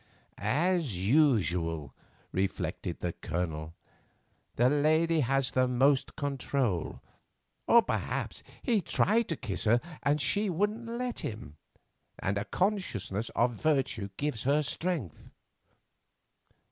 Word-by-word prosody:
"As 150 - 0
usual," 90 - +2 0.4
reflected 95 +1 -2
the - - -2
Colonel, 80 -1 -4 0.8
"the 120 - +4
lady 155 +4 +3
has 135 0 +1
the 130 0 +2
most 130 +2 +2
control. 135 - -1 0.7
Or 235 0 +7
perhaps - - -3 0.2
he 230 -6 +2
tried 220 +6 +2
to 165 - 0
kiss 105 -3 -3
her 115 +3 +5 0.2
and 145 +1 +2
she 205 +7 +1
wouldn't 210 +6 -1
let 240 +1 -3
him, 105 -9 -6 0.6
and 100 +1 -1
a 100 - -4
consciousness 120 - -1
of 120 +1 +2
virtue 135 -9 +1
gives 145 -6 -2
her 145 +4 +2
strength." 145 - -3
135 Hz, 110 wpm, -30 LUFS, 105-165 Hz, 0.8 s, Or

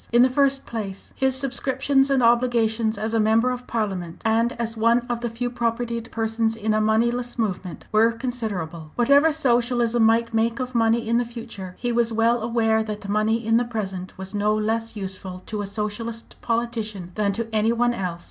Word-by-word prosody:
In 240 +1 +6
the 255 - +3
first 275 0 +2
place, 200 -4 -6
his 265 -1 +1
subscriptions 270 +1 +1
and 270 -2 +2
obligations 230 -2 +2
as 220 +2 -3
a 225 - +2
member 220 +3 +3
of 250 0 -6
Parliament, 190 -7 -3
and 230 +2 +2
as 230 -1 -3
one 230 +2 +3
of 240 -2 -2
the 240 - -2
few 235 +2 -3
propertied 235 -1 -2
persons 225 0 0
in 220 -1 -1
a 215 - +2
moneyless 235 +3 +1
movement, 190 -5 -3
were 220 +2 +4
considerable. 205 -10 -4
Whatever 280 +6 +5
Socialism 240 -4 +1
might 230 +1 +3
make 230 +2 +1
of 255 0 -4
money 230 0 +2
in 235 +1 +2
the 245 - +2
future, 225 -6 -8
he 245 - -2
was 235 -1 +2
well 230 +1 +2
aware 225 -1 +2
that 210 -2 -5
money 215 +2 +1
in 225 +1 +4
the 240 - +2
present 195 -6 -5
was 190 +1 -6
no 210 +1 +1
less 225 +1 -1
useful 190 -2 -6
to 215 -1 -4
a 200 - -4
Socialist 220 +3 -5
politician 225 -6 -2
than 205 0 +1
to 230 +2 -3
any 220 +1 +2
one 240 +1 +2
else. 180 -6 -3
230 Hz, 190 wpm, -23 LUFS, 215-240 Hz, -, In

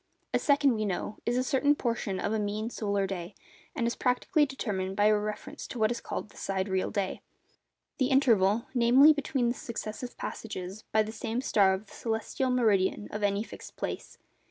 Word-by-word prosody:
A - - +3
second, 285 -2 +4
we 215 -1 -1
know, 205 +1 -3
is 240 +1 +2
a 255 - +2
certain 285 +2 +3
portion 230 -7 -2
of 205 - -1
a 220 - +1
mean 210 +2 -2
solar 200 -3 0
day, 190 0 -5 0.4
and 240 -6 0
is 235 - 0
practically 290 +5 +2
determined 195 -8 -3
by 205 +1 +3
a 215 0 +6
reference 210 0 -4
to - - -7
what 220 0 +2
is 240 - -3
called 210 - -5
a - - -17
sidereal 190 -1 -1
day—the 205 +5 -5
interval, 230 -6 +3
namely, 255 +5 +7
between 270 -4 0
the - - +1
successive 235 0 -6
passages 195 -1 -6
by 215 0 +4
the 215 - -6
same 225 +1 -3
star 205 -7 +4
of 195 +3 -8
the - - -17
celestial 225 +3 -2
meridian 210 -5 +2
of 210 - -4
any 205 0 +1
fixed - - -11
place. - - -5
220 Hz, 185 wpm, -29 LUFS, 200-250 Hz, 0.4 s, namely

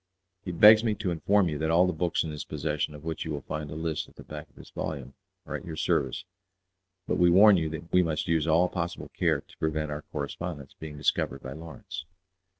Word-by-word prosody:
He 90 - -4
begs 105 +5 +8
me 110 -3 +1
to 100 -3 -2
inform 95 +3 +3
you 75 -3 -3
that 80 0 0
all 85 +2 +5
the 90 - 0
books 85 +1 0
in 80 - -4
his 75 - -5
possession, 75 0 -2
of 75 - -11
which 80 -1 -3
you 80 - -6
will 75 -3 -4
find 75 +2 -5
a 75 - -6
list 80 -1 -3
at - - -23
the - - -11
back 75 0 -9
of - - -31
this - - -14
volume, 70 -4 -5 0.3
are - - -6
at - - -4
your 80 - -6
service; 65 -4 0 0.8
but - - 0
we 90 0 +6
warn 100 +4 +8
you 80 -3 0
that 80 +1 -7
we 90 - +6
must 80 -2 -1
use 80 -2 +1
all 85 +3 +4
possible 85 -1 -4
care - - +2
to - - -21
prevent 75 -1 -1
our 75 0 -4
correspondence 75 -1 -6
being 75 -2 -7
discovered 75 - 0
by 65 - -6
Lawrence." 95 +3 -8
80 Hz, 235 wpm, -28 LUFS, 75-90 Hz, 0.8 s, begs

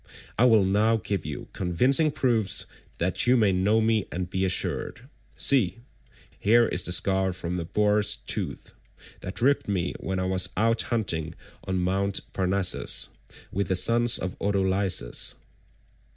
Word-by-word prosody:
I 120 - +3
will 110 -5 +5
now 105 +4 +2
give 100 -6 -4
you 75 - -6
convincing 125 - +2
proofs 120 -8 0 0.3
that 90 +6 0
you 125 +1 +5
may 105 -4 +3
know 100 +4 +2
me 110 -2 +1
and 90 0 -3
be 95 +1 -2
assured. 105 +6 -2 0.3
See, 110 -8 +2 0.6
here 115 +3 +4
is 90 - -2
the 90 - -3
scar 95 +1 0
from 85 0 -5
the 85 -2 -3
boar's 105 +2 +2
tooth - - -4 0.5
that 95 +5 -4
ripped 140 +2 +2
me 90 -4 -1
when 95 0 -3
I 95 - -1
was 95 -1 +1
out 115 +3 +2
hunting 85 -9 -1 0.3
on 95 0 -2
Mt. 100 +2 0
Parnassus 95 0 +1 0.4
with 100 -1 -2
the 95 - 0
sons 115 +5 +3
of 95 0 -5
Autolycus." 95 -9 0
100 Hz, 150 wpm, -26 LUFS, 90-110 Hz, 0.6 s, will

